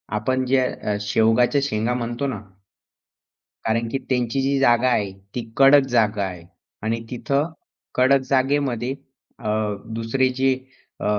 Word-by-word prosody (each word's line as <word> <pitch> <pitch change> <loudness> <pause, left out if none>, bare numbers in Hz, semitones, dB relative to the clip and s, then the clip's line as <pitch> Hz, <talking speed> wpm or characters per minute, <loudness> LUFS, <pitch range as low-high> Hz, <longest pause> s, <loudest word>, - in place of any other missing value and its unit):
आपण 130 +5 0
जे 130 +1 +3
अ, 105 -4 -3
शेवगाच्या 115 +6 +3
शेंगा 120 -3 0
म्हणतो 120 +2 -2
ना. 120 -6 -3 1.2
कारण 115 +1 0
की - - 0
त्यांची 125 +1 0
जी 140 +1 +1
जागा 120 -1 +4
आहे, 105 -5 0 0.2
ती 115 -2 -5
कडक 135 0 +6
जागा 110 -4 +2
आहे 90 -3 -5 0.4
आणि 115 +1 -1
तिथं 140 +6 -1 0.4
कडक 130 +2 +4
जागेमध्ये 135 -2 +1 0.5
अ, 105 - -4 0.5
दुसरी 120 +3 +1
जी 135 0 +3 0.5
अ, - - -5
125 Hz, 135 wpm, -22 LUFS, 115-135 Hz, 1.2 s, कडक